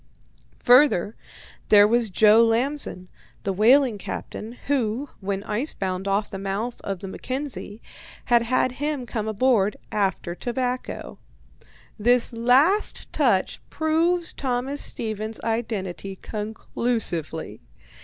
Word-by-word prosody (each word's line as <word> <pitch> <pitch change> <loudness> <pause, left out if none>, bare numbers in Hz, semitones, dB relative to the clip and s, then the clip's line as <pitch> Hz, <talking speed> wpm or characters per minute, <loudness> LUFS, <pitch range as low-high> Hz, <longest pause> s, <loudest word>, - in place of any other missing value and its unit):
Further, 245 -6 +5 0.5
there 205 -1 +7
was 235 0 +1
Joe 215 +4 +6
Lamson, 230 -4 0 0.4
the 195 - -1
whaling 235 +2 +4
captain, 220 +3 -6
who, 265 0 -1
when 195 0 -3
ice 225 +9 -1
bound 190 0 -3
off 200 +2 +1
the 195 - -7
mouth 200 +5 -3
of 195 -2 -4
the 195 - -6
Mackenzie, 255 -1 -6 0.4
had 240 -1 +4
had 255 +2 +1
him 285 0 -3
come 220 -2 -4
aboard 215 -2 +2
after 190 -4 -1
tobacco. 250 +5 -4 0.8
This 240 +2 +3
last 265 - +2
touch - - +1
proves 335 +2 +1
Thomas 265 +2 -2
Stevens's 220 0 -3
identity 205 -5 -3
conclusively. 210 -6 -2
225 Hz, 110 wpm, -24 LUFS, 200-255 Hz, 0.8 s, there